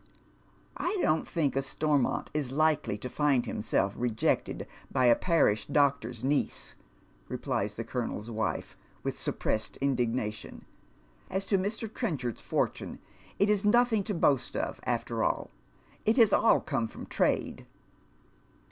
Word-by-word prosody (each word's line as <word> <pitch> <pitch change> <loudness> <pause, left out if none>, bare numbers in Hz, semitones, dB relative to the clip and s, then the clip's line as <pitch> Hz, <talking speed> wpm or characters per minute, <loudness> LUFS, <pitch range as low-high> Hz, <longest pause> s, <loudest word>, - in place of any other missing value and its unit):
" - - -21
1 420 - -1
don't 155 - +2
think 150 -6 0
a 135 - +2
Stormont 145 0 0
is 145 -4 -2
Hkely 150 -7 +1
to - - -3
find 135 -2 +2
himself 105 -3 0
rejected 115 -3 0 0.3
by 130 - +2
a 120 -1 +7
parish 160 - +2
doctor's 130 -5 +1
niece," 140 +2 0 0.5
replies 105 +1 -2
the 115 - -4
colonel's 115 -2 -4
wife, 110 0 -2 0.3
with - - -2
sup - - -3
pressed 110 - -1
indignation. 120 -5 -2 0.3
" - - -32
As 190 +1 -1
to 200 - +1
Mr. 215 +4 -2
Trenchard's 150 - -3
fortune, - - -2 0.4
it 200 - +3
is 210 -2 +2
nothing 225 0 +4
to 210 - -2
boast 140 -6 +2
of - - -2
after - - -1
all. - - -1 0.5
It 220 +3 +2
has 225 -4 +6
all 230 - +5
come 130 -6 -1
from - - -9
trade." - - 0
135 Hz, 145 wpm, -29 LUFS, 115-180 Hz, 0.5 s, a